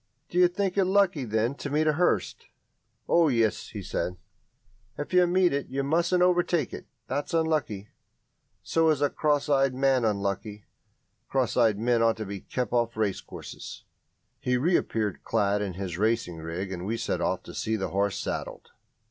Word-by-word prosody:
"Do 180 Hz, -, 0 dB
you 180 Hz, -, +7 dB
think 195 Hz, +1 st, -1 dB
it 190 Hz, -, +4 dB
lucky, 190 Hz, -7 st, +2 dB
then, 110 Hz, +3 st, 0 dB
to 145 Hz, -, -5 dB
meet 150 Hz, +2 st, +1 dB
a 155 Hz, -, +3 dB
hearse?" 175 Hz, +4 st, +1 dB, 0.7 s
"Oh, 170 Hz, -1 st, +4 dB
yes," 115 Hz, -6 st, +1 dB
he -, -, -7 dB
said, 90 Hz, 0 st, -3 dB, 0.8 s
"if 145 Hz, -, -5 dB
you 180 Hz, -1 st, +5 dB
meet 180 Hz, -1 st, +3 dB
it. 140 Hz, 0 st, -2 dB
You 135 Hz, +1 st, -2 dB
mustn't 170 Hz, +5 st, +2 dB
overtake 175 Hz, -4 st, +2 dB
it -, -, -8 dB, 0.2 s
that's 145 Hz, +6 st, -3 dB
unlucky. 150 Hz, -11 st, 0 dB, 0.7 s
So 165 Hz, -1 st, +2 dB
is 145 Hz, -2 st, +2 dB
a 145 Hz, -, +2 dB
cross 150 Hz, -1 st, +1 dB
eyed 135 Hz, -2 st, +2 dB
man 135 Hz, -1 st, +2 dB
unlucky. 100 Hz, 0 st, -2 dB, 0.6 s
Cross 130 Hz, -3 st, 0 dB
eyed 110 Hz, -4 st, +3 dB
men 120 Hz, +1 st, +2 dB
ought 115 Hz, -1 st, +3 dB
to 110 Hz, -, -4 dB
be 100 Hz, 0 st, -6 dB
kept 125 Hz, +2 st, -4 dB
off 115 Hz, -2 st, +1 dB
racecourses." 105 Hz, -3 st, -5 dB, 0.6 s
He 125 Hz, 0 st, +1 dB
reappeared 115 Hz, -, 0 dB
clad 105 Hz, -2 st, +1 dB
in 100 Hz, -3 st, -3 dB
his 90 Hz, -2 st, -5 dB
racing 110 Hz, -5 st, 0 dB
rig, 85 Hz, +4 st, -5 dB
and 90 Hz, -2 st, -5 dB
we 110 Hz, +4 st, -2 dB
set -, -, -2 dB
off -, -, -1 dB
to -, -, -10 dB
see 110 Hz, -, -1 dB
the 95 Hz, -3 st, -2 dB
horse 100 Hz, +1 st, 0 dB
saddled. -, -, -5 dB
125 Hz, 175 wpm, -27 LUFS, 105-160 Hz, 0.8 s, you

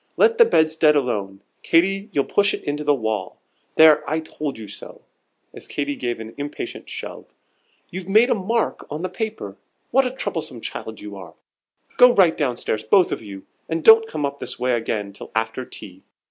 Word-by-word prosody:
Let 460 Hz, 0 st, +4 dB
the 470 Hz, -, +9 dB
bedstead 160 Hz, -, +3 dB
alone, 100 Hz, -8 st, -2 dB, 0.2 s
Katy, 195 Hz, +5 st, +2 dB
you'll 145 Hz, -6 st, +1 dB
push 200 Hz, 0 st, +2 dB
it -, -, -11 dB
into 145 Hz, +1 st, -3 dB
the 145 Hz, -1 st, +3 dB
wall. 110 Hz, -4 st, -3 dB, 0.4 s
There, 160 Hz, -1 st, +7 dB
I 155 Hz, +2 st, 0 dB
told 150 Hz, -3 st, -6 dB
you 110 Hz, -2 st, -9 dB
so!" -, -, -11 dB, 0.5 s
as -, -, -10 dB
Katy 145 Hz, 0 st, -3 dB
gave 120 Hz, -3 st, -3 dB
an 110 Hz, 0 st, -8 dB
impatient 145 Hz, +1 st, -6 dB
shove, -, -, -7 dB, 0.7 s
"you've 185 Hz, 0 st, -7 dB
made 220 Hz, +6 st, +5 dB
a -, -, +6 dB
bad 195 Hz, -4 st, -5 dB
mark 230 Hz, 0 st, 0 dB
on 155 Hz, +4 st, -5 dB
the 185 Hz, -, -2 dB
paper. 185 Hz, -, -5 dB, 0.3 s
What 270 Hz, 0 st, +3 dB
a -, -, -1 dB
troublesome 165 Hz, -, -5 dB
child 110 Hz, -1 st, -7 dB
you 105 Hz, -1 st, -8 dB
are! 95 Hz, -2 st, -11 dB, 0.6 s
Go 250 Hz, 0 st, +7 dB
right 180 Hz, -4 st, +5 dB
down 130 Hz, -6 st, -1 dB
stairs, 110 Hz, 0 st, -2 dB
both 180 Hz, -, +4 dB
of -, -, -3 dB
you, 100 Hz, -3 st, -10 dB, 0.2 s
and 165 Hz, -1 st, -2 dB
don't 225 Hz, 0 st, +7 dB
come 155 Hz, -8 st, -3 dB
up 140 Hz, 0 st, -5 dB
this -, -, -6 dB
way 125 Hz, +1 st, 0 dB
again 110 Hz, -3 st, -2 dB
till -, -, -11 dB
after 115 Hz, +3 st, -2 dB
tea. 95 Hz, -5 st, -12 dB
150 Hz, 195 wpm, -22 LUFS, 110-190 Hz, 0.7 s, the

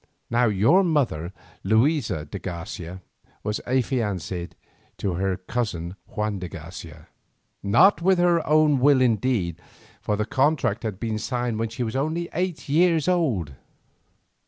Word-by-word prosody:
Now 120 Hz, +1 st, +3 dB
your 110 Hz, -, +4 dB
mother, 125 Hz, -, 0 dB, 0.3 s
Luisa 110 Hz, -, +1 dB
de 75 Hz, -, -7 dB
Garcia, 90 Hz, 0 st, -7 dB, 0.4 s
was 105 Hz, 0 st, -2 dB
affianced 105 Hz, -9 st, -1 dB, 0.4 s
to 95 Hz, -, -2 dB
her 95 Hz, +1 st, -1 dB
cousin 95 Hz, -4 st, -3 dB
Juan 105 Hz, -2 st, -3 dB
de 90 Hz, -1 st, -6 dB
Garcia, 80 Hz, -1 st, -10 dB, 0.5 s
not 120 Hz, -, +5 dB
with 190 Hz, +2 st, +4 dB
her 175 Hz, -2 st, +3 dB
own 150 Hz, -2 st, +4 dB
will 140 Hz, +1 st, +5 dB
indeed, 110 Hz, -8 st, +1 dB, 0.4 s
for 105 Hz, -, -1 dB
the 105 Hz, +1 st, -1 dB
contract 130 Hz, -3 st, +1 dB
had 105 Hz, -5 st, -4 dB
been 110 Hz, -2 st, -2 dB
signed 120 Hz, -2 st, -2 dB
when 115 Hz, 0 st, -1 dB
she 120 Hz, +3 st, -4 dB
was 115 Hz, +1 st, -4 dB
only 160 Hz, +5 st, -1 dB
eight 180 Hz, -2 st, -2 dB
years 165 Hz, +1 st, +3 dB
old. 130 Hz, -, +1 dB
115 Hz, 135 wpm, -24 LUFS, 95-145 Hz, 0.5 s, not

